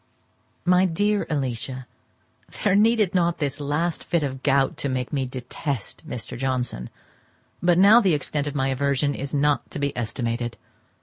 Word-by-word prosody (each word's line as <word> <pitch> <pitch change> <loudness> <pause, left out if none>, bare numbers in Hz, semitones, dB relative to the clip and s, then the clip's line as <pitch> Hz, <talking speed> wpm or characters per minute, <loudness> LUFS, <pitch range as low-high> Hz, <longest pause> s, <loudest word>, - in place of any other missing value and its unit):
My 180 +1 +5
dear 205 +4 +1
Alicia,—There 130 - -4
needed 215 -2 +3
not 175 -2 +2
this 145 -1 -2
last 150 +4 -1
fit 170 -3 0
of 140 -2 -1
the 135 - -9
gout 135 0 +2
to 140 - -1
make 130 +2 -3
me 135 -2 0
detest 130 0 -5
Mr. 125 +2 -5
Johnson, 125 - -2 0.7
but 175 -1 +3
now 205 +6 +7
the 185 -7 +3
extent 145 0 -2
of 145 - -4
my 135 -1 +1
aversion 140 +1 +1
is 140 +1 -4
not 145 0 +1
to - - -5
be 140 -1 -1
estimated. 120 0 -3
140 Hz, 160 wpm, -24 LUFS, 130-170 Hz, 0.7 s, now